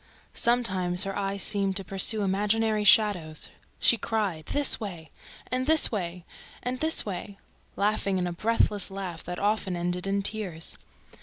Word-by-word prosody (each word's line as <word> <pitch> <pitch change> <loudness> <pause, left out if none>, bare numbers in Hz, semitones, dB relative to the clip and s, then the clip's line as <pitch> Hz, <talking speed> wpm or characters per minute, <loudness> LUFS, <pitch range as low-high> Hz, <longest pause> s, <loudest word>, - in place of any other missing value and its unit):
Sometimes 190 -7 +1
her 195 -1 -5
eyes 200 0 -2
seemed 195 -2 +1
to 195 - +1
pursue 195 +3 +6
imaginary 210 +2 0
shadows. 190 -7 +2 0.3
She 235 - +4
cried, 195 -8 -3
"This 290 -1 +2
way," 175 -7 -8 0.4
and 255 +1 -2
"This 315 0 +5
way," 180 -4 -5 0.4
and 250 +1 -4
"This 315 +2 +3
way," 200 0 -7 0.4
laughing 200 -3 -1
a 175 - -4
breathless 210 +1 +1
laugh 190 -4 -7
that 180 +1 -6
often 205 -2 -1
ended 180 +2 -3
in 200 0 -1
tears. 195 -6 -1
200 Hz, 145 wpm, -26 LUFS, 180-215 Hz, 0.4 s, pursue